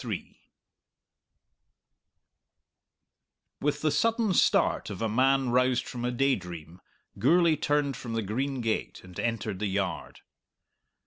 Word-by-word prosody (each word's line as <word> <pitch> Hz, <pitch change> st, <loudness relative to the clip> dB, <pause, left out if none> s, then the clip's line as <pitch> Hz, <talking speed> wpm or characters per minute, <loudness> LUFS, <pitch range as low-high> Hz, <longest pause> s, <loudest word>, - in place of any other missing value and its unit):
With 145 Hz, +1 st, -1 dB
the 155 Hz, -, +2 dB
sudden 225 Hz, 0 st, +1 dB
start -, -, +2 dB
of -, -, -6 dB
a 115 Hz, -, 0 dB
man 130 Hz, +3 st, +2 dB
roused 125 Hz, 0 st, +2 dB
from 120 Hz, -1 st, -6 dB
a -, -, +1 dB
daydream 90 Hz, -, -2 dB, 0.4 s
Gourlay 170 Hz, -2 st, +4 dB
turned 145 Hz, -2 st, 0 dB
from 115 Hz, -1 st, -6 dB
the 115 Hz, -1 st, -1 dB
green 130 Hz, +6 st, -2 dB
gate 115 Hz, -1 st, -2 dB
and 90 Hz, -1 st, -10 dB
entered 115 Hz, -4 st, -2 dB
the 105 Hz, -, -1 dB
yard. 95 Hz, -4 st, -3 dB
125 Hz, 115 wpm, -28 LUFS, 105-140 Hz, 0.4 s, Gourlay